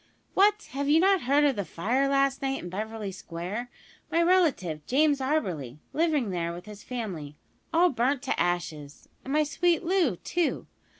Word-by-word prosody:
"What! 415 +2 +3
have 280 +2 -2
you 310 +2 +6
not 385 0 +4
heard 280 +4 +3
of 285 -3 +3
the 200 - -2
fire 230 - 0
last 275 0 +2
night 270 0 -1
in 175 - -6
Beverly 215 +1 -4
Square 190 +6 -6 0.4
my 335 - +1
relative, 295 - +2
James 290 +2 +3
Auberly 180 - -1 0.2
living 300 - +1
there 170 -2 -2
with 175 +1 -9
his 210 -1 -10
family 185 - -5 0.4
all 345 +1 +4
burnt 255 +3 0
to 270 - -1
ashes 160 -5 -2 0.2
and 270 - -6
my 305 +1 +3
sweet 335 +3 +1
Loo, 345 - +2
too? 345 - -1
260 Hz, 170 wpm, -27 LUFS, 185-305 Hz, 0.4 s, you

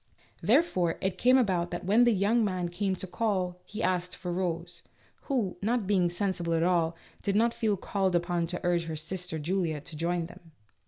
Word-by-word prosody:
Therefore 190 - +2
it 190 -1 -2
came 255 +2 +6
about 185 -8 +1
that 175 0 -5
when 220 +6 +5
the 240 - +5
young 215 +3 +2
man 185 -4 -1
came 190 +2 -1
to 185 - -5
call, 185 -3 -1
he 210 - -5
asked 180 0 0
for 180 -1 -4
Rose, 175 -1 -3 0.4
who, 230 -11 -1
not 225 +1 +1
being 185 -3 +2
sensible 175 -2 -1
at 165 - +2
all, 170 -2 +2 0.3
did 200 - -1
not 230 +2 +3
feel 220 -4 0
called 190 -1 0
upon 175 -1 0
to 180 +1 -3
urge 175 -1 +2
her 160 -1 -4
sister 175 +2 -5
Julia 165 0 -1
to 155 - -10
join 170 +2 -1
them. 165 -1 -14
180 Hz, 195 wpm, -29 LUFS, 170-205 Hz, 0.4 s, came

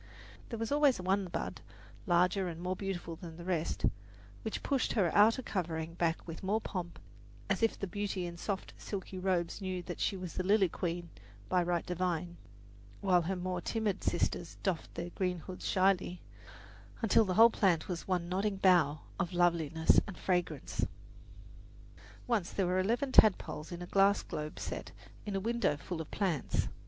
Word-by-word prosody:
There 230 - -4
was 225 +2 -3
always 285 -5 +4
one 190 +2 +1
bud 175 - -4 0.5
larger 180 +2 +3
and 165 -1 -5
more 180 +1 -2
beautiful 180 -4 -4
than 165 -2 -9
the 170 - -8
rest, 170 -3 -1 0.6
which - - -4
pushed 275 -3 +1
her 190 -8 +2
outer, 225 +5 +5
covering 165 -5 -3
back 170 -1 -1
with 165 -1 -7
more 200 +3 +1
pomp, 180 -5 -5 0.5
as 195 - +1
if 225 - +2
the - - -3
beauty 195 -1 -3
in 170 -1 -6
soft, 195 +3 -4
silky 190 -2 -5
robes 180 0 0
knew 185 -2 -3
that 175 - -6
she 195 - 0
was 180 -2 -6
the - - -1
lily 195 -1 +4
queen 170 0 -3 0.4
by 180 -1 +3
right 175 -1 0
divine, 175 -1 -2 0.6
while 180 -3 +4
her 185 +3 -2
more 180 0 -3
timid 215 0 -1
sisters 175 0 -1
doffed 185 -5 -1
their 175 +1 -4
green 180 -1 -1
hoods 185 +2 -7
shyly, 185 -1 +2 0.8
until 225 0 +5
the 185 -3 -1
whole 230 +3 +8
plant 180 -7 +2
was 175 -2 -4
one 180 -2 0
nodding 195 +3 0
bough 170 -6 +4 0.2
of 175 - -1
loveliness 165 -2 +4
and 200 - -7
fragrance. 180 -1 -1 1.4
Once 225 -8 0
there 195 - 0
were 180 +1 +1
eleven 240 +8 +1
tadpoles 160 -9 +4
in 175 0 -5
a - - -5
glass 195 +2 +3
globe 150 0 -5
set - - -5 0.4
in 200 - -2
a - - +1
window 230 -7 +1
full 160 +3 -5
of 160 - -8
plants. 180 -10 0
180 Hz, 170 wpm, -33 LUFS, 170-195 Hz, 1.4 s, whole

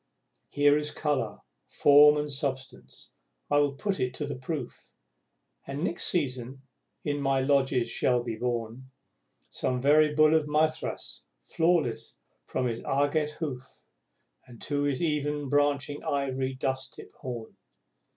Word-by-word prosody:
Here 145 0 +4
is 150 0 0
colour, 140 -10 -2 0.3
form 150 +1 +6
and 150 0 -2
substance, 135 -2 -5 0.4
I 145 - +5
will 145 -1 +2
put 195 +6 -2
it 125 0 -1
to 150 - -3
the 145 -1 -4
proof 130 0 -6 0.8
And, 140 +3 -4
next 175 - -1
season, 130 -5 -2 0.4
in 145 -1 -2
my 135 -1 +2
lodges 135 -3 +2
shall 120 +1 +1
be 115 -2 -4
born 120 +2 -4 0.6
Some 125 -1 -1
very 150 +3 +4
Bull 155 0 +5
of 155 -2 +2
Mithras, 155 +1 -1 0.2
flawless 165 - 0 0.3
from 130 - -2
his 115 -2 -3
agate 145 +2 0
hoof 135 -5 -7 0.8
To 145 -1 -1
his 145 +2 0
even 150 -2 -1
branching 145 0 +1
ivory, 135 -1 -1
dusk 130 +1 -3
tipped - - -13
horn. 120 -5 -7
140 Hz, 130 wpm, -28 LUFS, 130-150 Hz, 0.8 s, form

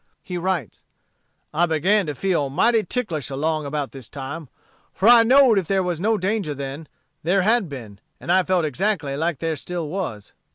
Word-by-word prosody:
He 180 - -6
writes: 175 - -3 0.7
"I 170 +3 +2
began 180 +5 +2
to 150 - -3
feel 170 -5 0
mighty 225 - +3
ticklish 185 - -3
along 155 +2 -1
about 145 -1 -3
this 130 -4 -10
time; 145 +2 -7 0.5
for 195 - +1
I 240 0 +9
knowed 250 -2 +6
if 180 - -5
there 195 -1 +1
was 175 -2 -2
no 220 +2 +2
danger 190 -5 -1
then, 140 +3 -6 0.3
there 185 +4 +2
had 220 -3 +2
been, 115 -8 -9 0.2
and - - -3
I 185 +1 +5
felt 180 -2 +1
exactly 155 -2 -1
like 160 +1 -1
there 165 +1 -2
still 170 +2 -5
was." 160 - -5
170 Hz, 180 wpm, -22 LUFS, 145-195 Hz, 0.7 s, I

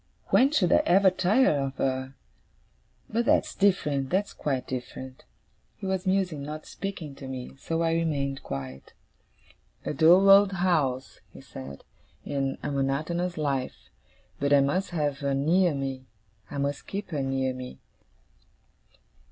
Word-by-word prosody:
When 265 - +5
should 190 - +2
I - - +6
ever 190 +1 +5
tire 185 - +3
of 135 -1 -3
her! 130 0 -2 0.9
But 235 +2 -1
that's - - +2
different, 150 -9 +1
that's 195 +3 0
quite 135 -4 -2
different.' 130 +1 -7 0.5
He - - -9
was 190 -1 -2
musing, 185 -6 0
not 150 +2 -6
speaking 180 -7 -6
to 135 - -8
me; 130 0 -7
so 165 +3 -1
I 165 0 +1
remained 140 -5 -1
quiet. 65 -1 -7 0.9
'A - - -2
dull 170 +7 +6
old 195 0 +7
house,' 155 -8 0
he - - -13
said, 70 +1 -10 0.4
'and 135 -1 -2
a - - -2
monotonous 155 +6 -1
life; 140 -4 -3 0.5
but 140 +1 0
I 145 - +7
must 180 +8 0
have 145 -5 -1
her 140 -1 0
near 165 +4 +2
me. 135 -1 -4 0.4
I 145 - -6
must 140 0 -2
keep 200 -1 -5
her 145 -3 -1
near 135 -1 -1
me. 125 0 -8
145 Hz, 145 wpm, -27 LUFS, 135-180 Hz, 0.9 s, old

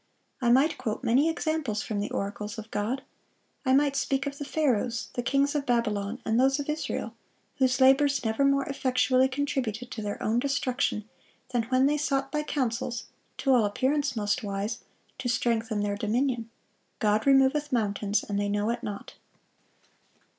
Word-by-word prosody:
I 240 - +2
might 270 +6 +4
quote 235 -1 -3
many 260 +6 +3
examples 315 -10 -1
from 210 -2 -3
the 205 - -2
oracles 205 +2 -4
of 220 0 -8
God. 240 +7 -2 0.6
I 260 -2 +2
might 280 0 +3
speak 275 0 0
of 280 0 -5
the 285 - -4
Pharaohs, 245 -6 0
the 245 - -2
kings 275 +3 +1
of 290 -2 -2
Babylon, 220 -2 0
and 225 +2 +2
those 270 +2 +3
of 285 - -4
Israel, 305 +1 -3 0.4
whose 260 -1 +2
labors 270 0 +4
never 220 +5 +1
more 275 0 +3
effectually 260 -1 +2
contributed 255 -4 -2
to 225 - -5
their 205 -1 -4
own 225 +2 +2
destruction 255 -5 -1 0.4
than 240 -3 0
when 255 +2 +3
they 295 +2 +2
sought 275 -2 0
by 300 - 0
counsels, 245 -5 -2 0.3
to 270 - +2
all 245 -3 +5
appearance 265 +6 0
most 205 +2 0
wise, 200 0 -3 0.4
to 255 -2 -2
strengthen 230 -2 0
their 205 -1 -1
dominion. 230 +2 0 0.5
'God 215 +2 +1
removeth 275 +2 +4
mountains, 205 -3 0
and 200 -1 -2
they 205 0 0
know 205 +2 0
it 235 0 -3
not. 205 -4 -6
250 Hz, 170 wpm, -27 LUFS, 220-275 Hz, 0.6 s, all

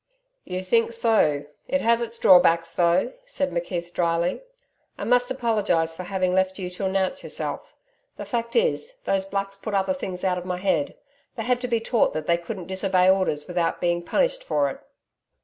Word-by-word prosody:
'You 185 +1 -4
think 230 +4 +2
so! 215 -11 +3 0.2
It 275 - 0
has 235 +1 +3
its 235 0 -2
drawbacks, 170 -4 +5
though,' 175 - +2
said 290 - -1
McKeith 175 0 -4
dryly. 170 +1 0 0.6
'I - - -5
must 245 +1 +2
apologise 210 -10 +1
for 165 - -7
having 185 0 -1
left 190 0 +1
you 180 -2 -5
to 180 +2 -4
announce 190 +6 0
yourself. - - -4 0.4
The - - -6
fact 235 -1 -3
is, 480 0 +1
those 195 -1 0
Blacks 195 0 -3
put 205 +1 -4
other 190 -1 +1
things 185 0 -6
out 180 -1 +1
of - - -8
my 180 -1 -2
head. 180 -6 0 0.4
They 225 - -4
had 245 +1 0
to 250 - -2
be 235 -2 +1
taught 230 0 +1
they 155 +2 0
couldn't 180 +1 -7
disobey 190 0 +3
orders 185 -6 0
without 175 -2 -1
being 175 0 0
punished - - 0
for 145 - 0
it.' - - -10
190 Hz, 185 wpm, -24 LUFS, 175-230 Hz, 0.6 s, drawbacks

